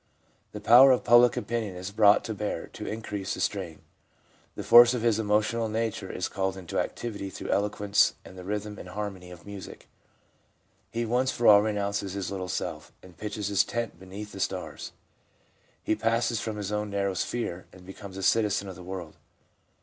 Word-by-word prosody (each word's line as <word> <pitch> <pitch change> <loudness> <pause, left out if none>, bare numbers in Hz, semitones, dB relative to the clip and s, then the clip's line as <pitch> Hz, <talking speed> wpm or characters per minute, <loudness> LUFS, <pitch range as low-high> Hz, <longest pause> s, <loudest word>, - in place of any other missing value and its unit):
The - - -7
power 125 +4 +8
of 130 -2 +3
public 120 0 +6
opinion 115 -5 -3
is 90 +2 -6
brought 105 0 +5
to 110 - -4
bear 105 0 -3
to - - -7
increase 105 -3 -4
the - - -8
strain. 95 -6 -3 0.7
The - - -5
force 120 +1 +8
of 115 - -3
his 115 -2 +2
emotional 110 +2 +1
nature 110 -3 -3
is 90 - -3
called 95 0 -2
into 90 -3 -4
activity 100 -4 -4
through - - -8
eloquence 105 0 +2
and - - -12
the 90 - -9
rhythm 105 +2 -4
and 90 - -9
harmony 95 -2 -6
of 90 -1 -13
music. 100 -2 -10 1.0
He 115 0 -2
once 125 +3 +1
for 120 - -3
all 105 -1 +8
re 110 +1 0
nounces 100 -1 -2
his 100 -2 -4
little 95 -2 -4
self, - - -4
and 90 -2 -15
pitches 105 +1 -4
his 100 - +3
tent 115 -7 -4
beneath 100 +3 -9
the 95 - -9
stars. - - -4 0.9
He - - +1
passes 115 +1 0
from 110 -1 -4
his 105 -1 -4
own 105 0 -2
narrow 100 -1 -1
sphere, 95 -2 -3
and 90 -1 -15
becomes 95 0 -10
a 95 - -5
citizen 105 -1 +2
of 95 - -8
the 90 - -11
world. 90 -3 -7
105 Hz, 190 wpm, -27 LUFS, 95-110 Hz, 1.0 s, power